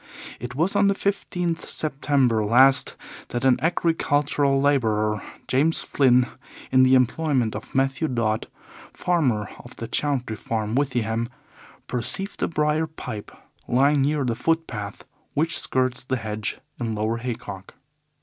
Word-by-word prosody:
It 125 +2 -7
was 170 +8 0
on 200 0 +4
the 200 - +2
15th 180 -4 -2
September 135 -6 +1
last 130 +6 +5 0.3
that 120 +2 -3
an 130 -2 +4
agricultural 145 -4 +1
labourer, 110 -7 +1 0.3
James 150 +5 +2
Flynn, 125 -3 +4 0.5
in 130 - +5
the 130 0 +6
employment 130 -2 +1
of - - -8
Mathew 135 +4 +1
Dodd, 115 -4 -1 0.5
farmer, 130 - 0
of 120 - -12
the 115 - -6
Chauntry 125 -3 -1
Farm, 110 -1 -2
Withyham, 115 -4 0 0.6
perceived 195 - -3
a - - +2
briar 150 0 0
pipe 110 -9 -7 0.4
lying 140 +3 +3
near 145 +1 +1
the 120 - 0
footpath 115 -9 -2 0.3
which 160 +2 +2
skirts 130 -1 0
the 130 0 -1
hedge 110 -2 -4 0.2
in 115 -3 -2
Lower 110 +2 -1
Haycock. 105 -5 -6
130 Hz, 130 wpm, -24 LUFS, 115-150 Hz, 0.6 s, the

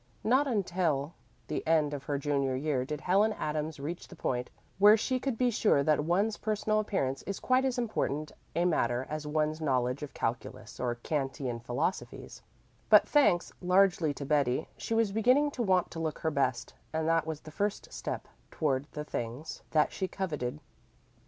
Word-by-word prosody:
Not 260 +5 +3
until 175 - 0 0.3
the 155 - -3
end 155 -2 +3
of 140 -1 -5
her 145 - -1
junior 140 -2 0
year 135 -2 0
did 150 +1 -5
Helen 205 +4 +3
Adams 155 -3 -3
reach 160 +5 -5
the - - -12
point 125 -1 -2 0.3
where 210 +2 +8
she 255 +4 0
could 260 -2 -2
be 250 0 +2
sure 205 -10 +3
that 150 0 +2
one's 195 +7 +1
personal 215 0 0
appearance 140 -11 -1
is 200 - -3
quite 255 +1 +2
as 260 -2 0
important 155 - -1 0.2
a 170 +1 +2
matter 125 -7 +1
as 155 -1 -4
one's 155 +1 0
knowledge 130 -2 0
of 150 - -7
calculus 115 +1 -4
or 120 -1 -1
Kantian 135 -2 -3
philosophies; 125 +10 -3 0.5
but, - - +7
thanks 200 - +3
largely 180 -3 +3
to 140 - -5
Betty, 140 -1 +1
she 225 - -3
was 225 -3 +2
beginning 255 +8 +3
to 255 - -4
want 185 -5 +2
to 165 - -6
look 160 -2 -2
her 160 - -1
best, 130 -3 -1 0.2
and 160 0 -1
that 165 -1 +2
was 155 -2 -4
the 155 - -11
first 205 +5 -2
step - - -4 0.2
toward 140 -3 -1
the 150 0 -5
things 120 +4 -5
that 155 -1 +3
she 190 - -2
coveted. 150 -9 -3
155 Hz, 180 wpm, -30 LUFS, 140-200 Hz, 0.5 s, where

